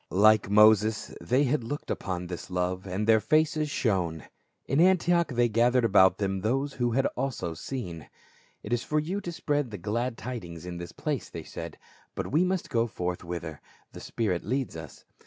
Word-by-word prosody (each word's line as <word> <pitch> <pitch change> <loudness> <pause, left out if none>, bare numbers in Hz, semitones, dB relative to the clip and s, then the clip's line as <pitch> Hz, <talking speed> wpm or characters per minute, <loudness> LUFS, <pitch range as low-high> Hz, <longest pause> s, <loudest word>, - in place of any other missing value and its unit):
Like 110 +2 +4
Moses 105 0 +4
they 130 +4 +2
had 140 -1 +1
looked 145 +6 -5
upon 90 -1 -3
this 90 -1 -7
love, 90 +1 -2
and 95 +3 -2
their 110 0 +5
faces 155 +3 +2
shone. 90 - -1 0.4
In 140 +4 +2
Antioch 175 -1 +4
they 120 -1 +3
gathered 120 +2 +3
about 95 -3 +5
them 95 -2 -1
those 135 +7 0
who 120 -2 0
had 135 +2 +2
also 125 -11 -2
seen. 85 - -6 0.3
" - - -33
It 105 - -3
is 120 - +1
for 155 - 0
you 180 +7 -3
to 175 - -5
spread 145 -5 -1
the 105 - -6
glad 115 +6 -2
tidings 90 -9 -7
in 90 -1 -6
this 85 -1 -7
place," - - -3
they - - -7
said, - - -8 0.4
"but - - -4
we 155 +6 +4
must 185 -1 -1
go 115 -1 +2
forth 90 -5 -4
whither 85 -3 -6 0.3
the - - -10
spirit 95 -7 -2
leads 130 -1 -2
us." 80 -3 -10
110 Hz, 190 wpm, -28 LUFS, 90-135 Hz, 0.4 s, their